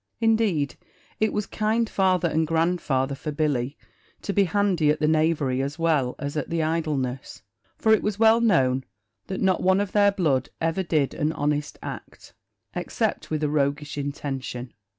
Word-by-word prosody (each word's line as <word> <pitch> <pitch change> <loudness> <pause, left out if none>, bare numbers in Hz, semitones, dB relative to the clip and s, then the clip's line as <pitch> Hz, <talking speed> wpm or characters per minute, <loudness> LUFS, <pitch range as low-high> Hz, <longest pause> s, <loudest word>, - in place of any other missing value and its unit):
Indeed 220 - +1 0.4
it 215 0 +2
was 210 - -1
kind 220 +2 0
father 185 -4 +2
and 160 0 0
grandfather 160 -5 0
for 150 +3 -5
Billy 145 -3 -1 0.5
to 200 - -2
be 200 +1 +4
handy 180 -4 +2
at 150 - +2
the 150 - +2
knavery 155 -4 +2
as 140 +3 -3
well 155 -7 +1
as 145 +1 -5
at 150 - -2
the 165 -1 0
idleness; 150 -6 -2 0.3
for 220 - +4
it 220 - +3
was 210 -1 -2
well 225 +1 +5
known 135 - +3 0.4
that 190 - -4
not 190 -2 +2
one 190 +1 +3
of 205 -2 -2
their 205 -1 +4
blood 160 -10 0
ever 165 +3 0
did 155 -6 0
an 150 +1 0
honest 145 -1 -1
act, - - -9 0.4
except - - -2
with 155 -1 -2
a - - +2
roguish 145 0 -1
intention. 135 -3 -5
155 Hz, 170 wpm, -25 LUFS, 140-190 Hz, 0.5 s, well